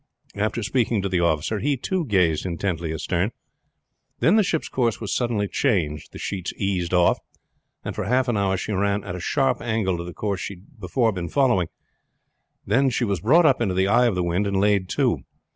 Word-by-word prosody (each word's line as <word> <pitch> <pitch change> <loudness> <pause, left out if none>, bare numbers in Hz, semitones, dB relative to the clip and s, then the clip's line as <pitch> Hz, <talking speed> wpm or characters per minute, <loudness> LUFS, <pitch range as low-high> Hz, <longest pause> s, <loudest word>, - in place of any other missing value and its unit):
After 110 +3 -1
speaking 115 -3 0
to 100 - -1
the 90 -1 +1
officer 85 +5 0
he 140 +4 0
too 180 +6 -2
gazed 90 - +2
intently 85 -2 -2
astern. 85 +4 -1 0.9
Then 170 - +4
the 220 - +5
ship's 175 -5 -1
course 120 -4 0
was 110 - -3
suddenly 115 -5 0
changed, 85 - -1
the - - -10
sheets 95 -3 -4
eased 95 -4 -1
off, 90 -1 +3 0.7
and - - -3
for - - -3
half 130 +1 +2
an 120 - +1
hour 95 -2 +1
she 100 - -4
ran 100 +1 0
at - - -5
a - - -5
sharp 135 - 0
angle 110 -6 -1
to - - -4
the 90 - -7
course 100 +2 -3
she 100 - -5
had 105 +8 -21
before 110 +5 +1
been 90 -4 -4
following, 120 - +2 1.0
then 130 +7 +3
she 125 0 -1
was 100 -4 -1
brought 160 - +5
up 135 -5 +4
into 95 -6 0
the 95 +1 +2
eye 120 +4 +4
of 110 - 0
the 90 - 0
wind 90 +4 0
and 100 -1 0
laid 100 -2 +2
to. - - +1
100 Hz, 210 wpm, -23 LUFS, 90-120 Hz, 1.0 s, the